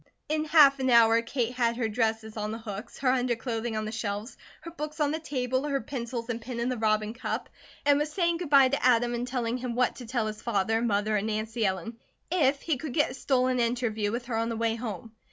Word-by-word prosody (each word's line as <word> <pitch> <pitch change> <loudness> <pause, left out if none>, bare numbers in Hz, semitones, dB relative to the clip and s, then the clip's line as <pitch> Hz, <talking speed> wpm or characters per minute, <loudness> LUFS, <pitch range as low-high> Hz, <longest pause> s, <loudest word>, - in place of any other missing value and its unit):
In 310 0 0
half 295 -3 +6
an 260 0 +1
hour 230 -1 +6
Kate 240 0 -2
had 235 -2 +1
her 235 -3 0
dresses 220 -1 -1
on 210 -1 -3
the 220 - -4
hooks, 220 0 -8
her 260 -2 +2
underclothing 240 -2 -1
on 215 - -2
the 215 - -4
shelves, 215 0 -4 0.3
her 335 +1 -8
books 305 -1 -6
on 295 -1 +2
the 315 - -2
table, 260 -4 -1
her 280 -1 0
pencils 235 -1 -5
and 235 -1 -3
pen 235 +1 -6
in 235 +2 0
the 255 - -2
robin 215 0 +1
cup, 240 - -4 0.4
and 285 0 +5
was 300 +1 -1
saying 340 -1 +1
goodbye 280 -6 +5
to 280 - -1
Adam, 240 -1 +4
and 240 +1 -2
telling 245 -2 -1
him 250 -2 -4
what 250 0 +1
to 245 - -9
tell 235 -2 -1
his 215 0 -5
father, 225 0 0
mother, 215 -2 +1
and 205 +2 -2
Nancy 220 +1 -2
Ellen 190 +5 -4 0.3
if 285 -6 +2
he 320 -5 0
could 275 -1 -6
get 295 -4 +2
a - - -7
stolen 255 -1 +1
interview 230 -3 0
with 240 +2 -3
her 235 -2 -3
on 230 +1 0
the 230 - -3
way 230 0 +1
home. 225 -2 -6
240 Hz, 235 wpm, -28 LUFS, 225-260 Hz, 0.4 s, half